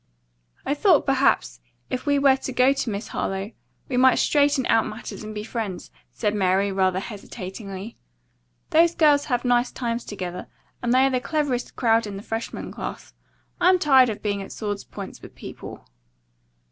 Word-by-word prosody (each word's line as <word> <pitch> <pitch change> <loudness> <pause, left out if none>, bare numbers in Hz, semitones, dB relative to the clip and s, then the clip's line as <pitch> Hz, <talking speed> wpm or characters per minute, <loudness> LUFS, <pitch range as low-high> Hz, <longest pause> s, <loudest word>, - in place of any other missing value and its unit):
"I 280 - +1
thought, 330 +1 +4
perhaps, 270 0 +2 0.3
if 255 +2 -3
we 285 0 +3
were 275 -1 +5
to 265 - -5
go 255 +2 +4
to 270 -3 -2
Miss 205 +1 -4
Harlowe, 195 +2 -3 0.4
we 250 - -2
might 260 0 +6
straighten 285 -3 +3
out 225 - +3
matters 215 0 -7
and 215 0 -7
be 210 - -4
friends," 215 -5 -5 0.2
said 210 -2 -1
Mary 195 0 +2
rather 185 -1 +1
hesitatingly. 195 0 -8 0.7
"Those 335 +1 +4
girls 295 -3 +4
have 245 -3 -1
nice 245 0 +2
times 235 -1 -3
together, 180 -3 -6 0.3
and 240 -2 0
they 260 +2 +5
are 270 - +2
the 255 -1 0
cleverest 285 -4 -2
crowd 225 -2 +2
in 200 -1 -6
the 200 - -8
freshman 225 +1 -5
class. - - -7 0.5
I'm 370 +1 +5
tired 265 -7 +5
of 215 - -5
being 205 -1 -1
at 195 - -8
sword's 205 -2 -4
points 200 -2 -9
with - - -13
people." - - -10
235 Hz, 170 wpm, -24 LUFS, 205-270 Hz, 0.7 s, might